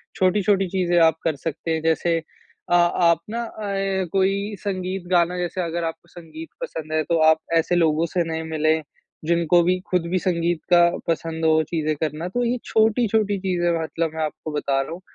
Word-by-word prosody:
छोटी-छोटी 195 +1 +2
चीज़ें 175 -2 +1
आप 160 -1 +4
कर 160 -3 0
सकते 165 +3 -4
हैं। 160 0 0
जैसे 165 +1 +1 0.5
अ, - - +1
आप 175 -1 +4
ना 230 +2 -3 0.2
ऐ 195 -1 -1
कोई 195 +2 0
संगीत 185 -1 -3
गाना 175 0 +3
जैसे 180 +1 -2
अगर 170 0 -3
आपको 165 +1 -6
संगीत 160 -2 -10
पसंद 155 -1 -6
है, 155 0 +1
तो 170 +2 0
आप 160 - +5 0.2
ऐसे 165 +2 +1
लोगों 165 -1 +2
से 175 - +2
नए 160 0 -2
मिलें 160 0 +1 0.4
जिनको 170 +1 +3
भी 180 +1 +1
ख़ुद 180 -2 +1
भी 185 - +1
संगीत 170 -1 0
का 175 - +8 0.3
पसंद 165 0 -2
हो 160 0 +4
चीज़े 155 -2 -1
करना। 155 +2 -3
तो 245 +7 -1
ये 240 +1 0
छोटी-छोटी 220 -2 +2
चीज़ें 180 -2 0
मतलब 160 0 -2
मैं 160 - -1
आपको 155 +1 -5
बता 140 -2 0
रहा 135 - -6
हूँ 170 +2 -7
170 Hz, 185 wpm, -23 LUFS, 160-185 Hz, 0.5 s, का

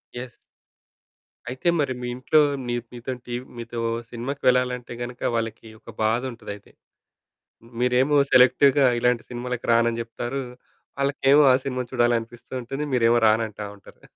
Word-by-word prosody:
Yes. 120 0 -6 1.2
అయితే 130 +7 -4
మరి 135 -3 0
మీ 125 - -4
ఇంట్లో 140 +5 +3 0.3
నీ 120 - -1 0.2
మీతోని 125 +1 -6
టీ 120 - -5 0.2
మీతో 115 0 -6 0.3
సినిమాకు 125 +4 -5
వెళ్ళాలంటే 125 -1 +1
గనుక 120 0 -6
వాళ్ళకి 115 0 -3
ఒక 115 - -13
బాధుంటదయితే. 115 -2 -3 1.1
మీరేమో 130 +4 +3
సెలెక్టివ్‌గా 130 +2 +5
ఇలాంటి 125 -1 +1
సినిమాలకి 125 0 -5
రానని 115 0 +2
జెప్తారు. 120 +3 -4 0.6
ఆళ్ళకేమో 140 +1 +4
ఆ - - +6
సినిమా 125 -2 -2
చూడాలనిపిస్తూ 120 0 -1
ఉంటుంది. 135 +5 -4
మీరేమో 120 -1 +4
రానంటా 110 -1 0
ఉంటారు. - - -18
125 Hz, 125 wpm, -24 LUFS, 115-130 Hz, 1.2 s, ఆ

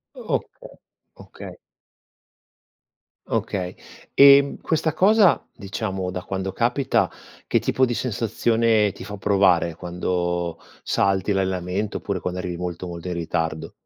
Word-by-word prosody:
O - - -2
okay, - - -7 0.5
okay. - - -11 1.7
Okay, 90 -2 -2 0.4
ehm, 140 0 +7
questa 160 -1 0
cosa 200 +2 +4
diciamo 95 -3 -4
da 90 0 -5
quando 95 0 -3
capita, 125 +6 +1 0.4
che - - +2
tipo 130 - +2
di 120 - -2
sensazione 115 -2 +1
ti - - -10
fa 105 - -7
provare 95 -4 +2
quando 85 0 -2 0.2
salti 100 +1 +1
l'allenamento, 95 +1 -1
oppure 100 -2 -3
quando 90 +1 -4
arrivi 90 -1 -4
molto, 90 0 -5
molto 85 0 -7
in - - -2
ritardo? 80 -2 -3
95 Hz, 120 wpm, -23 LUFS, 90-115 Hz, 1.7 s, ehm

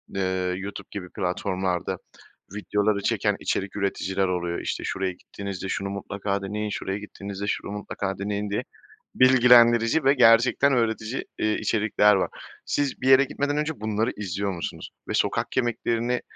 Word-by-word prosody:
eee, 95 -1 0
YouTube 100 0 -7
gibi 90 -3 -6
platformlarda 90 0 -2 0.6
videoları 105 0 0
çeken 105 -1 +1
içerik 95 -1 -2
üreticiler 95 -1 -1
oluyor, 85 -1 -2
işte - - -3
"Şuraya 95 0 -1
gittiğinizde 95 +1 -7
şunu 100 +1 -2
mutlaka 100 0 -3
deneyin, 105 +2 -3
şuraya 95 -1 -3
gittiğinizde 100 -1 -7
şunu 100 - -2
mutlaka 100 -1 -4
deneyin." 100 +1 -2
diye 100 - -1 0.5
bilgilendirici 125 +1 +6
ve 135 +1 +5
gerçekten 120 +2 +5
öğretici, 115 0 -1
eee, 110 0 +1
içerikler 105 -1 +3
var. 95 - 0 0.4
Siz 145 -3 -1
bir 130 - +1
yere 135 +1 +8
gitmeden 145 +1 -2
önce 150 -4 -2
bunları 110 +2 0
izliyor 100 0 -2
musunuz? 85 -2 -6 0.2
Ve - - -3
sokak - - 0
yemeklerini, 120 0 0
105 Hz, 145 wpm, -25 LUFS, 95-115 Hz, 0.6 s, yere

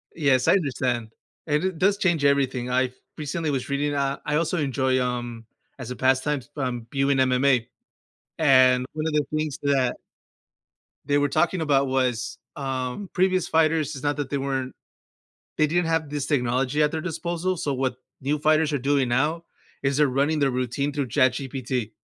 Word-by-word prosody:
Yes, 135 -5 +2
I - - +6
understand, 130 - 0 0.4
and 150 +2 +1
it 185 -2 -1
does 195 +4 +3
change 170 -7 +1
everything, 135 -3 +1
I 130 0 +1 0.3
recently 155 +1 -2
was 135 -2 -3
reading 145 +1 0
uh, 140 -1 0
I 150 - 0
also 165 +3 0
enjoy, 130 -3 +1
um 120 -2 -4 0.3
as 125 -1 -6
a - - -4
pastime, 130 +3 +2
s 130 - -17
um, 125 -4 -3
viewing 135 0 +1
MMA 130 -1 +3 0.7
and, 130 -4 +5
one 155 0 -3
of 160 - -2
the 150 -1 +2
things 155 -2 -2
that 135 -3 +2 1.1
they 145 - +2
were 145 0 +2
talking 170 +4 +1
about 140 -3 +2
was, 125 -3 -1 0.2
um, 135 +6 -4
previous 185 -1 +2
fighters 155 -2 +2
it's 130 - -9
not 145 0 +1
that 145 -2 -3
they 140 - -1
weren't 135 -1 -3 0.8
they 155 - +4
didn't 175 +3 +1
have 165 -2 0
this 145 -2 -2
technology 130 +1 +1
at 150 - +3
their 160 - -2
disposal, 175 +1 -2
so 145 -4 -2
what 130 -1 -1 0.3
new 145 +3 0
fighters 155 +1 +2
are 145 - +1
doing 135 0 +1
now 155 +7 0 0.4
is 135 0 +1
they're 150 -1 +4
running 140 +4 +1
their 140 -2 +2
routine 130 +3 -2
through 140 -2 -2
ChatGPT, 130 -2 0
140 Hz, 175 wpm, -24 LUFS, 130-155 Hz, 1.1 s, I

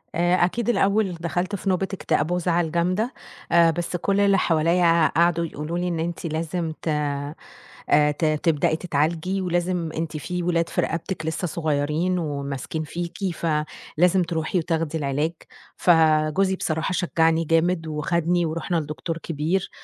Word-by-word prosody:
آآ 175 +1 +3
أكيد 235 +5 -2
الأول 200 -3 +2
دخلْت 175 +4 -2
في 195 +1 -3
نوبة 190 +1 +1
اكتئاب 160 -3 0
وزعل 175 -2 +1
جامدة، 185 +8 0 0.4
آآ 170 -1 +6
بس 175 +2 -3
كل 200 +3 0
اللي 200 -1 +4
حواليّا 170 0 +3
قعدوا 170 0 +2
يقولوا 155 +2 -4
لي 180 0 -1
إن 170 -2 -2
أنتِ 170 +1 -3
لازم 160 +1 -2
ت - - -7
آآ 145 -1 -1 0.8
ت 155 +3 -2
تبدئي 155 0 +2
تتعالجي 165 +4 -1
ولازم 175 -1 -1
أنتِ 160 -1 -3
في 180 +3 -4
ولاد 170 -1 +1
في - - 0
رقبتِك 165 0 -3
لسّه 160 +3 -2
صغيرين 155 +3 0
وماسكين 145 0 -4
فيكِ، 170 +3 -5 0.2
فلازم 165 +3 0
تروحي 165 +2 -2
وتاخدي 165 -1 -1
العلاج. 145 +2 -1 0.5
فجوزي 160 +3 +3
بصراحة 160 +1 -2
شجّعني 165 -2 +2
جامد 165 +1 +1
وخدني 170 +3 0
ورُحنا 165 +2 -2
لدكتور 160 +2 -4
كبير 165 +4 -2
165 Hz, 140 wpm, -24 LUFS, 155-180 Hz, 0.8 s, آآ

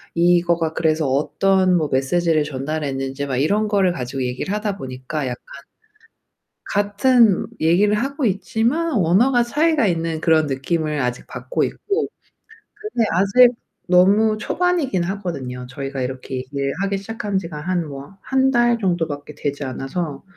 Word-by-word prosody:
이거가 170 -1 +2
그래서 155 -3 +1
어떤 185 +7 +2
뭐 155 -3 0
메시지를 155 +4 +1
전달했는지 140 -1 -3
막 130 -2 -2
이런 205 +10 +1
거를 195 -3 +2
가지고 130 -4 -4
얘기를 125 +10 -3
하다 210 -2 -2
보니까 130 +1 -5
약간 125 -1 -4 1.3
같은 205 +1 +3
얘기를 180 +6 +3
하고 275 +4 -2
있지만 235 - 0
언어가 235 +6 +3
차이가 295 +1 +2
있는 165 -2 -1
그런 160 -2 +3
느낌을 150 +3 -1
아직 125 -1 -3
받고 - - -2
있고, 420 +2 -2 0.7
근데 425 - -2
아직 200 +7 +5 0.4
너무 200 +5 +4
초반이긴 320 - 0
하거든요. 140 -10 -5
저희가 135 0 -5
이렇게 130 0 -5
일하기 145 +9 -1
시작한 210 -1 -3
지가 165 -5 -6
한 175 0 -1
뭐 140 +6 -10
1 265 0 +2
달 240 -2 +3
정도밖에 165 -7 -2
되지 145 0 -3
않아서 135 +3 -4
175 Hz, 310 characters per minute, -21 LUFS, 140-210 Hz, 1.3 s, 아직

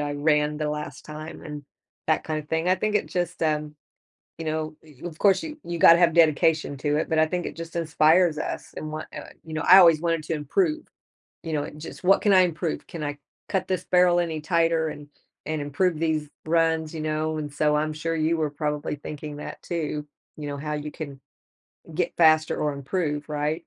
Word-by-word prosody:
I 145 0 -2
ran 150 0 +1
the 150 -1 -2
last 150 -2 -6
time 155 +1 -8
and 150 -1 -7 0.5
that 155 - +2
kinda 155 -1 -3
thing, 160 +3 -1
I 185 - +5
think 215 +2 -1
it 210 - +1
just, 175 -2 -3
um, 150 -1 0 0.6
you 165 - -6
know, 155 0 -2
y 150 -4 -18
of 160 -2 -6
course 195 -2 +4
you 310 -1 -6
you 170 -1 -4
gotta 170 +1 +8
have 170 -2 +4
dedication 160 -2 +3
to 145 +1 0
it, - - -1
but 160 -1 +2
I 155 - +5
think 180 +1 -2
it - - -5
just 165 0 -8
inspires 165 0 +3
us - - -5
and 155 0 -5
what, 155 0 -5
uh, - - -9
you 160 - -9
know, 155 - -2
I 185 +2 +8
always 165 -4 +7
wanted 165 -2 0
to 165 - -2
improve, 310 - 0 0.6
you 160 - -5
know, 145 -1 -1
just 150 +5 -10
"What 195 +2 +5
can 205 - +4
I 185 - +7
improve? 170 -1 -2
Can 165 -3 -7
I 145 0 -4 0.3
cut 185 -1 -1
this 185 -1 -1
barrel 180 -1 +4
any 160 -3 -2
tighter 165 0 +1
and 145 -1 -8 0.4
and 155 -1 -2
improve 155 +3 0
these 155 -2 0 0.2
runs." 160 -1 +1
You 160 - -4
know? 155 0 -1
And 145 -1 -5
so, 150 +1 +2
I'm 155 +1 0
sure 165 +2 -3
you 160 +1 +1
were 155 -2 -1
probably 150 0 -2
thinking 150 0 -7
that 150 - -8
too, 150 -3 -3 0.3
you 150 -1 -6
know, 140 - -4
how 150 +2 -4
you 150 0 -4
can, 140 -4 -8 0.8
get 175 -1 0
faster 155 -1 +4
or 150 -1 0
improve, 145 +1 -2
right? 150 +1 -1
155 Hz, 215 wpm, -25 LUFS, 150-170 Hz, 0.8 s, gotta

